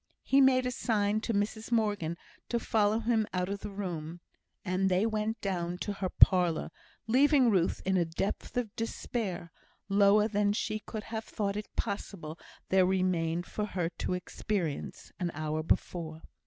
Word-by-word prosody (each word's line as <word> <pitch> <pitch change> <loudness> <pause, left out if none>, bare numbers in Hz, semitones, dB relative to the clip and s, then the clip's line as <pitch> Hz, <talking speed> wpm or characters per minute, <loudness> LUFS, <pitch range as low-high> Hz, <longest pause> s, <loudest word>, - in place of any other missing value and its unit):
He 275 +1 +4
made 255 -1 +5
a 250 - 0
sign 215 -3 +1
to 230 - -2
Mrs 215 +2 -2
Morgan 205 -8 0 0.3
to 235 - +1
follow 215 0 +2
him 225 -2 +1
out 180 +1 0
of 200 0 -3
the 210 - -6
room, 175 -5 -5 0.5
and 185 +1 +1
they 185 +3 +2
went 220 0 -1
down 175 -3 -2
to 205 +3 -3
her 195 -2 -3
parlour, 175 -5 +4 0.3
leaving 260 +1 +5
Ruth 180 -4 +1
in 190 0 +2
a 175 - +3
depth 170 +8 -3
of 235 -3 -2
despair, 215 -6 -3 0.4
lower 200 +1 +5
than 205 -1 +1
she 215 0 -2
could 215 0 -6
have 220 0 -5
thought 200 -2 -2
it 210 0 -6
possible 170 -5 -4 0.3
there 190 0 +5
remained 180 -2 +1
for 210 - -3
her 175 -5 -1
to - - -1
experience, 180 -3 -3
an 175 -2 0
hour 155 +1 -2
before. 160 0 -2
200 Hz, 165 wpm, -30 LUFS, 180-220 Hz, 0.5 s, made